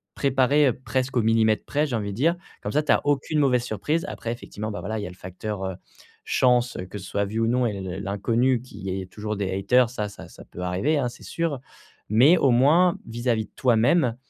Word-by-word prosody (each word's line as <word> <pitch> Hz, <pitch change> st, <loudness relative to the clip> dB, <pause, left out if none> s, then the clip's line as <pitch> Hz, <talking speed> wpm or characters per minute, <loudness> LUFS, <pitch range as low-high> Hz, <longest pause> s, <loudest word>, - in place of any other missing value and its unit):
préparées, 140 Hz, +2 st, +3 dB
heu, -, -, 0 dB
presque 130 Hz, 0 st, -1 dB
au -, -, +4 dB
millimètre 110 Hz, -1 st, +2 dB
près, 145 Hz, +1 st, 0 dB
j'ai 135 Hz, -5 st, -3 dB
envie 100 Hz, -2 st, -3 dB
de -, -, -6 dB
dire, 165 Hz, +7 st, +2 dB, 0.2 s
comme -, -, -4 dB
ça 150 Hz, -, +2 dB
tu 150 Hz, -, +1 dB
as -, -, 0 dB
aucune 145 Hz, +2 st, +1 dB
mauvaise 125 Hz, -4 st, +3 dB
surprise. 125 Hz, -, -2 dB
Après 115 Hz, -, -5 dB
effectivement, 110 Hz, -2 st, -6 dB
bah, 105 Hz, -, -5 dB
voilà, 110 Hz, +3 st, -3 dB
il -, -, -4 dB
y -, -, -4 dB
a -, -, -6 dB
le 90 Hz, -, -12 dB
facteur, 95 Hz, +2 st, -5 dB
heu, 95 Hz, -1 st, -4 dB, 0.5 s
chance, 125 Hz, -1 st, +2 dB
que 105 Hz, -, -7 dB
ce -, -, -10 dB
soit 100 Hz, +1 st, -1 dB
vu 110 Hz, +3 st, -3 dB
ou 115 Hz, -, +2 dB
non 125 Hz, +2 st, +2 dB
et 110 Hz, -3 st, -1 dB
l 95 Hz, -1 st, -6 dB
l 95 Hz, 0 st, -5 dB
l'inconnu 115 Hz, +5 st, +1 dB
qu'il 130 Hz, -, -14 dB
y 95 Hz, 0 st, -3 dB
ait -, -, -7 dB
toujours 105 Hz, +3 st, -5 dB
des 100 Hz, -2 st, -2 dB
haters 120 Hz, +5 st, +3 dB
ça 110 Hz, -4 st, -3 dB
ça 100 Hz, -, -11 dB
ça -, -, -14 dB
peut 90 Hz, -, -10 dB
arriver, 90 Hz, +13 st, 0 dB
hein, 130 Hz, -4 st, 0 dB
c'est 120 Hz, -, -14 dB
sûr. 165 Hz, -5 st, -2 dB, 0.5 s
Mais 130 Hz, -, +6 dB
au 135 Hz, -, +3 dB
moins, 155 Hz, +9 st, +4 dB
vis-à-vis 115 Hz, -1 st, -1 dB
de -, -, -38 dB
toi-même, 125 Hz, +2 st, +3 dB
120 Hz, 245 wpm, -24 LUFS, 105-135 Hz, 0.5 s, Mais